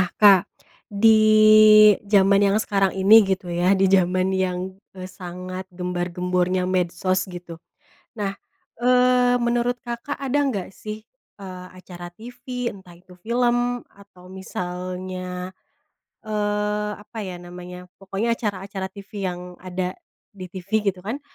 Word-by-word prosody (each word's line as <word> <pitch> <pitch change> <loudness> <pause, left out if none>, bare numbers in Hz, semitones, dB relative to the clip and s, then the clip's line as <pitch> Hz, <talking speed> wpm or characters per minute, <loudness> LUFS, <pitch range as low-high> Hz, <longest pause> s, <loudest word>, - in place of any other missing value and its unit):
Nah 180 - -1
Kak, 200 -3 +7 0.5
di 220 +2 +5 0.9
zaman 200 -1 +4
yang 200 0 +3
sekarang 195 -3 +1
ini 205 +4 +7
gitu 190 -3 -2
ya, 180 +3 +2
di 195 - +3
zaman 185 0 +2
yang, 185 0 -2 0.2
eee, 185 - -6
sangat 185 +1 -8
gembar-gembornya 180 0 -1
medsos 185 +1 -1
gitu. 175 -2 -10 0.6
Nah, 200 -3 -2 0.5
eee, 250 0 +4
menurut 240 +1 0
Kakak 240 +4 -5
ada 275 +1 -1
nggak 200 -7 -4
sih, 215 +2 -8 0.3
eee, 185 -2 -9
acara 175 -1 -10
TV 245 +5 -6
entah 185 -3 -15
itu 180 +1 -19
film 240 +2 0
atau 185 -2 -17
misalnya, 185 0 -6 0.7
eee, 210 0 -1
apa 215 +2 -12
ya 185 -3 -6
namanya, 180 +1 -10 0.2
pokoknya 195 +4 -2
acara-acara 195 -3 -4
TV 200 0 -6
yang 180 0 -5 0.2
ada 185 0 -4 0.4
di 185 -3 -9
TV 190 +4 -2
gitu 185 -1 -4
kan. 235 +8 -4
190 Hz, 125 wpm, -23 LUFS, 180-215 Hz, 0.9 s, Kak